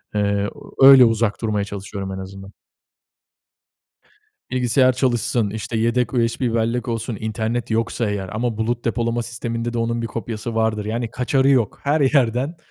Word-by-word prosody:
Eee, 100 0 0 0.3
öyle 135 -2 +9
uzak 115 -1 0
durmaya 105 -3 -1
çalışıyorum 100 -1 -6
en 95 - -5
azından. 95 +1 -9 2.0
Bilgisayar 130 +1 +3
çalışsın, 120 -4 0
işte 110 +1 -4
yedek 120 +2 0
USB 115 0 0
bellek 115 +2 -1
olsun, 115 -1 -3
internet 110 +1 -3
yoksa 115 0 -1
eğer 95 -2 -3
ama 115 0 -2
bulut 115 +2 -2
depolama 115 0 -1
sisteminde 120 0 -4
de 120 - -2
onun 115 0 -1
bir - - -2
kopyası 115 0 -5
vardır. 110 -2 0
Yani, 115 +1 -3
kaçarı 130 +3 +1
yok. 125 -7 +2
Her 145 +2 +1
yerden. 135 +2 +2
115 Hz, 145 wpm, -21 LUFS, 110-120 Hz, 2.0 s, öyle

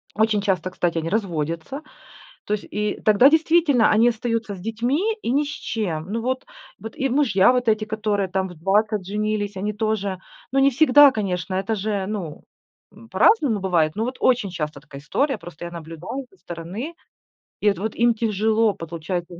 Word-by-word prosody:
Очень 220 -1 +2
часто, 185 -3 -1
кстати, 175 -2 -1
они 165 0 -2
разводятся, 170 - -3 0.6
то 210 - -1
есть 210 - -3
и 210 0 -2
тогда 215 +5 +6
действительно 320 -6 +4
они 225 +3 +5
остаются 230 -2 -2
с 185 - -11
детьми, 250 - -1
и 235 - -1
ни 285 +3 +2
с - - -6
чем. 185 - -3
Ну 230 +1 -2
вот 260 +2 -2 0.3
вот 225 +1 -8
и 270 0 -1
мужья 240 -7 +4
вот 250 -1 0
эти, 215 -1 +2
которые 210 -2 -1
там 190 +1 -1
в 180 - -10
20 200 +4 +1
женились, 210 0 -2
они 205 +3 -2
тоже, 205 -3 -2 0.3
ну, 270 - +2
не 275 - +5
всегда 290 +1 +7
конечно, 185 -6 -3
это 195 +4 -1
же, 205 -1 -2
ну, 190 -8 -5 0.5
м, 115 0 -16
по-разному 255 - +3
бывает, 170 -5 +1
но 215 - -1
вот 255 +1 -5
очень 245 -6 +2
часто 150 -4 -4
такая 140 -1 -11
история- 270 - 0
просто 175 0 -9
я 170 - -7
наблюдаю 170 - -7
со 385 - -23
стороны, 180 - -7 0.7
и 210 - +4
вот 200 -4 -1
вот 215 +2 -3
им 235 0 +3
тяжело 220 0 +1
получать 170 +1 -5
210 Hz, 185 wpm, -22 LUFS, 185-240 Hz, 0.7 s, всегда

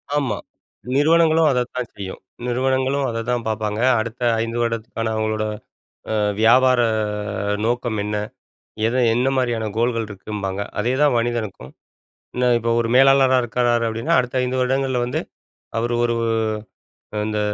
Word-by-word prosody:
ஆமா. 135 -8 0 0.6
நிறுவனங்களும் 160 +2 +4
அதத்தான் 125 -1 -2
செய்யும். 95 -2 -7 0.3
நிறுவனங்களும் 130 +2 +1
அதை 115 0 -3
தான் 120 -1 -1
பார்ப்பாங்க. 110 -1 -2 0.2
அடுத்த 115 +2 -5 0.2
5 115 +1 -3
வருடத்துக்கான 115 -1 -2
அவுங்களோட 110 0 -1 0.7
அ - - 0 0.3
வியாபார 125 +2 +5 0.7
அ - - 0
நோக்கம் 120 -1 -1
என்ன? 105 0 -2 0.7
எத 115 - -1 0.2
என்னமாரியான 125 -2 0
கோல்கள் 115 -1 +1
இருக்கும்பாங்க. 100 -1 -5 0.2
அதேதான் 130 +5 +2
மனிதனுக்கும். 115 - -3 0.6
என்ன 125 0 +1
இப்ப 115 0 -2
ஒரு 115 - -1
மேலாளரா 135 0 +6
இருக்கிறாரு 120 0 +1
அப்டீன்னா, 115 +1 -1
அடுத்த 125 0 -1
5 125 +1 -1
வருடங்கள்ல 130 0 0
வந்து 120 - -2 0.6
அவரு 120 +1 -1
ஒரு 120 -1 +1 1.1
இந்த 105 -1 -1
120 Hz, 125 wpm, -21 LUFS, 110-130 Hz, 1.1 s, மேலாளரா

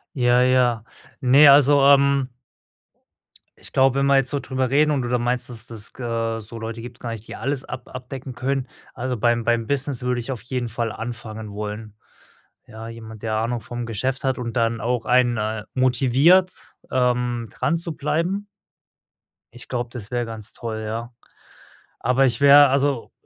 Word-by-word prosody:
Ja, 125 -1 +3
ja. 125 -3 +2 0.4
Ne, 140 +2 +7
also, 140 0 +6
ähm 140 -1 +4 1.3
ich - - -13
glaube, 135 0 +3
wenn 140 - +2
wir 140 - +4
jetzt 135 -1 +1
so 145 - -1
drüber 130 -2 -2
reden 150 +2 +3
und 140 -3 0
du 120 - -3
da 125 0 +1
meinst, 120 +1 -1
dass 115 -1 -6
des 110 -3 -5
ge 115 -2 -3
so 115 +2 -9
Leute 115 0 -6
gibt‘s 120 +1 -10
gar 120 - -5
nicht 115 -1 -7
die - - -7
alles 140 -1 -2
ab 125 - -8
abdecken 130 0 -8
können, 130 +1 -2 0.3
also 125 0 -3
beim 120 +1 +1
beim 120 -1 +1
Business 140 -1 -2
würde 125 -1 -1
ich 120 +3 -5
auf 120 -6 -7
jeden 125 0 -3
Fall 115 0 -3
anfangen 110 -2 -7
wollen. 105 +1 -6 0.7
Ja, 110 +1 -10
jemand, 110 -2 -10
der 110 -1 -1
Ahnung 115 +2 -1
vom 120 +2 -6
Geschäft 125 +4 -2
hat 130 -2 0
und 120 -2 -4
dann 115 0 +1
auch 120 0 -1
einen, 125 -1 +3
äh, 105 0 -3
motiviert, 135 +8 +4 0.4
ähm, 125 -2 0
dran 170 - -1
zu 165 -2 -4
bleiben 175 +7 -1 1.1
ich 120 0 -13
glaube, 120 -1 -3
das 110 -4 -8
wäre 120 -1 -1
ganz 110 0 -7
toll, 110 -2 -5
ja. 115 +3 -5 0.9
Aber, 125 +3 +2
ich 120 0 -1
wäre 140 0 +8
also 135 -2 0
125 Hz, 180 wpm, -22 LUFS, 115-135 Hz, 1.3 s, wäre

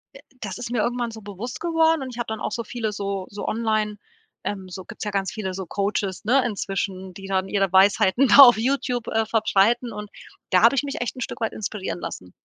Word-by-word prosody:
äh, - - -11 0.2
das 200 -4 -5
ist 240 -1 -6
mir 240 -3 +1
irgendwann 240 0 -1
so 220 0 -10
bewusst 210 +5 -7
geworden 325 -2 +2
und 260 - -6
ich - - -10
habe 240 - -2
dann 220 0 -4
auch - - -2
so 235 - -3
viele 225 -1 -3
so 200 -2 -3
so 205 - -6
online 215 -2 0 0.5
ähm, 190 -2 -4
so, 185 0 -8
gibt's - - -8
ja 210 - -2
ganz 195 -1 -1
viele, 190 -4 -4
so 190 0 -5
Coaches, 200 +1 -2
ne, 255 +4 +3
inzwischen, 195 -3 -3
die 195 - -9
dann 190 -1 0
ihre 195 -2 +1
Weisheiten 195 +6 +5
da - - +6
auf 245 -3 +8
YouTube, 250 -1 -1
äh, 225 0 +1
verbreiten 225 +2 +2
und 210 -1 -8 0.4
da 185 - +5
habe 230 +5 +6
ich 270 - +1
mich 280 -1 -4
echt 245 - -3
'n 255 - -8
Stück 235 - -5
weit 225 - 0
inspirieren 205 -3 -4
lassen. 90 - -7
215 Hz, 230 wpm, -23 LUFS, 195-240 Hz, 0.5 s, auf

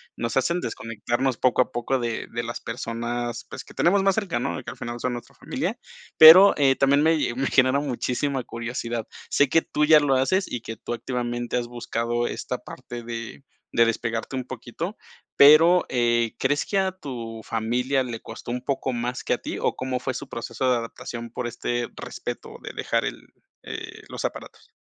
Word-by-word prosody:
nos 115 +3 -2
hacen 170 +6 +1
desconectarnos 120 +3 -2
poco 130 0 +3
a - - -20
poco 125 +2 0
de 115 -1 -3
de 120 0 -3
las 115 0 -5
personas, 120 0 -4
pues, - - -8
que - - -14
tenemos 195 +4 +3
más 195 -1 +3
cerca, 195 - -1
¿no?, 135 +3 -2
y 130 - -7
que - - -6
al - - -12
final 120 0 -6
son 125 - 0
nuestra 120 -1 -8
familia. - - -3 0.4
Pero, 175 +6 +11
eh, 135 -2 +3
también 140 +2 +4
me 160 0 +4 0.2
me 135 +2 0
genera 130 +2 +3
muchísima 135 0 -1
curiosidad. 115 -1 -4 0.2
Sé 145 -2 +3
que 165 - +4
tú 150 - -1
ya 155 0 +7
lo 140 -2 +2
haces 185 +9 +2
y 120 - -4
que 115 -1 -7
tú, 120 - -5
activamente, 120 0 -2
has 120 -1 -2
buscado 120 0 -2
esta - - -4
parte 120 -1 -9
de 115 +3 -7 0.3
de 115 - +5
despegarte 115 +2 -2
un 130 - -2
poquito, 130 - -6 0.4
pero, 165 +5 +8
eh, 120 -2 +1
¿crees 145 +2 +1
que 200 - -1
a 190 -1 +2
tu 120 -10 -7
familia 125 +5 0
le 120 -3 -5
costó 115 +2 -8
un 125 - -1
poco 135 -1 -1
más 120 +1 -3
que - - -3
a - - +3
ti - - -5
o - - 0
cómo 130 -1 -2
fue 130 - -2
su - - -6
proceso 115 +2 -2
de 125 - +4
adaptación 115 0 -6
por 125 - -3
este 120 0 -2
respeto - - -7
de - - -7
dejar - - 0
el - - -4 0.4
eh, - - -7
los - - -4
aparatos? - - -7
125 Hz, 195 wpm, -25 LUFS, 120-140 Hz, 0.4 s, Pero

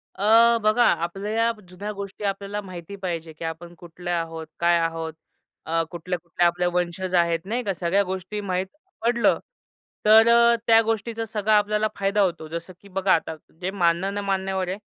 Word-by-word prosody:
अ, 230 +3 +5
बघा 215 +3 +4 0.2
आपल्या 195 +5 -3
या 230 +1 +2 0.2
जुन्या 200 +4 -6
गोष्टी 200 +1 -7
आपल्याला 200 +1 -2
माहिती 185 +1 -9
पाहिजे 165 -3 -4
की 160 +2 -9
आपण 170 +2 -6
कुठले 175 +1 -8
आहोत? 165 -2 -3
काय 170 0 +4
आहोत? 165 -1 -2 0.5
अ, 165 +1 +1
कुठल्या-कुठल्या 175 0 -1
आपल्या 175 +1 +1
वंशज 180 +1 -2
आहेत 170 -1 +3
नाही 235 +5 -2
का? 195 - 0
सगळ्या 180 +4 +1
गोष्टी 190 +3 -4
माहीत 185 -1 -2 0.4
पडलं 235 0 +3 0.7
तर 220 +2 +7
अ, 235 0 +6
त्या 225 -1 +7
गोष्टीचा 225 +1 -2
सगळा 215 0 +1
आपल्याला 210 +1 +1
फायदा 200 +1 +1
होतो. 170 -4 -1
जसं 170 +3 -6
की 200 - -16
बघा 190 0 +1
आता 160 0 -2 0.3
जे 185 +1 -2
मानणं-न-मानण्यावर 190 +1 0
आहे. 190 - -3
190 Hz, 165 wpm, -24 LUFS, 170-210 Hz, 0.7 s, तर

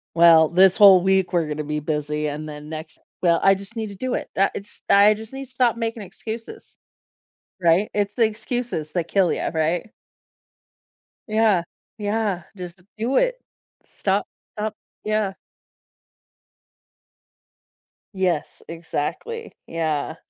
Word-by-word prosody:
Well, 165 -2 +7
this 185 +2 +5
whole 195 -3 +8
week 190 -1 +2
we're 170 -3 +2
gonna 150 0 -3
be 150 +1 -2
busy, 150 0 -2
and 150 +1 -5
then 150 0 -9
next 155 0 -8 0.2
well, 170 -2 +3
I 195 - +7
just 200 +4 -8
need 220 -1 -3
to 200 - -9
do 255 +5 -3
it. - - -4
That 195 +1 +3
it's 200 - -9
I 205 +2 +7
just 220 +3 -10
need 270 0 -6
to 255 - -21
stop 240 -2 +2
making 225 -1 -3
excuses, 220 +4 -9 0.9
right? 170 +4 +3
It's 205 -1 0
the 235 - +4
excuses 220 -7 -3
that 170 -1 -2
kill 190 -4 +2
you, - - -2
right? 165 +6 -1 1.4
Yeah. 215 -5 +3 0.3
Yeah, 205 -4 -1
just 180 -1 -9 0.2
do 240 +5 0
it. - - +1 0.4
Stop 195 +1 -1 0.3
stop 215 0 -3 0.3
yeah. 215 -2 0 2.8
Yes, 180 -5 -1
exactly. 170 - -4 0.2
Yeah. 160 -2 -2
190 Hz, 135 wpm, -23 LUFS, 165-220 Hz, 2.8 s, whole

